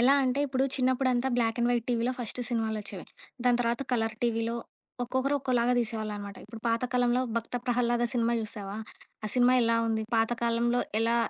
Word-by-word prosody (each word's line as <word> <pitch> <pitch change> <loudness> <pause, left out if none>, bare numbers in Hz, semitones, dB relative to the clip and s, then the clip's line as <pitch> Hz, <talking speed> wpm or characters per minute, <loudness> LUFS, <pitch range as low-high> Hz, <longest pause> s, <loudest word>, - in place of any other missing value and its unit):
ఎలా 265 +4 +6
అంటే 260 +1 +1
ఇప్పుడు 265 0 +1
చిన్నప్పుడంతా 255 -1 +2
బ్లాక్ 230 -1 +1
అండ్ 240 - +3
వైట్ 240 -2 +1
టీవీలో 240 +1 +1
ఫస్ట్ 245 0 -4
సినిమాలొచ్చేవి. 220 -5 -2 0.4
దాని 245 -1 +4
తర్వాత 235 +2 0
కలర్ 225 -2 +1
టీవీలో 230 -1 0 0.5
ఒక్కొక్కరు 260 +3 0
ఒక్కోలాగా 250 -2 +1
దీసేవాళ్ళనమాట. 215 -3 -3
ఇప్పుడు 220 +1 -10
పాత 230 +1 +1
కాలంలో 245 0 +3 0.2
'భక్త 230 +2 -2
ప్రహల్లాద' 240 -1 +2
సినిమా 235 -2 +1
జూశావా? 205 -2 -5 0.5
ఆ - - 0
సినిమా 250 0 +5
ఎలా 230 0 +3
ఉంది? 220 -1 0
పాత 225 0 +3
కాలంలో 235 +1 +2 0.2
ఎలా, 230 +1 +2
235 Hz, 165 wpm, -29 LUFS, 225-250 Hz, 0.5 s, ఎలా